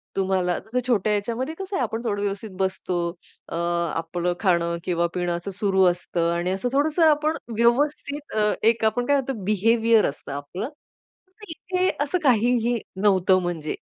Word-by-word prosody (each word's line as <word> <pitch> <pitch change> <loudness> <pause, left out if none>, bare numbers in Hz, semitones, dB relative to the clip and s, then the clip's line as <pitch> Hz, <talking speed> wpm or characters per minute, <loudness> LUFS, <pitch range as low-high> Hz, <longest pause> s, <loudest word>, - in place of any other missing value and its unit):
तुम्हाला 185 -2 +1 0.3
छोट्या 215 -4 +2
ह्याच्यामध्ये 235 +8 -2
कसं 385 +2 -5
आहे - - 0
आपण 225 - -3
थोडं 205 -4 -1
व्यवस्थित 205 +1 -3
बसतो, 190 -1 -1 0.5
अ, - - -6
आपलं 170 0 -1
खाणं 170 -4 +1
किंवा 170 -1 0
पिणं 175 -1 -1
असं 175 +3 -5
सुरु 190 0 +1
असतं 175 -1 -1
आणि 175 +2 -1
असं 195 +6 -1
थोडंसं 305 +4 +2
आपण 305 +1 +1 0.2
व्यवस्थित 285 +5 0
अ, 210 -1 +3
एक 225 0 +3
आपण 245 +3 +1
काय 285 - +3
म्हणतो 270 +1 -4
बिहेवियर 225 +3 +3
असतं 140 0 -9
आपलं. 145 - -5 0.8
इथे 365 +3 -1
असं 295 +5 0
काहीही 240 -2 +3 0.2
नव्हतं 190 -2 +4
म्हणजे, 170 -4 -3
205 Hz, 150 wpm, -24 LUFS, 175-245 Hz, 0.8 s, नव्हतं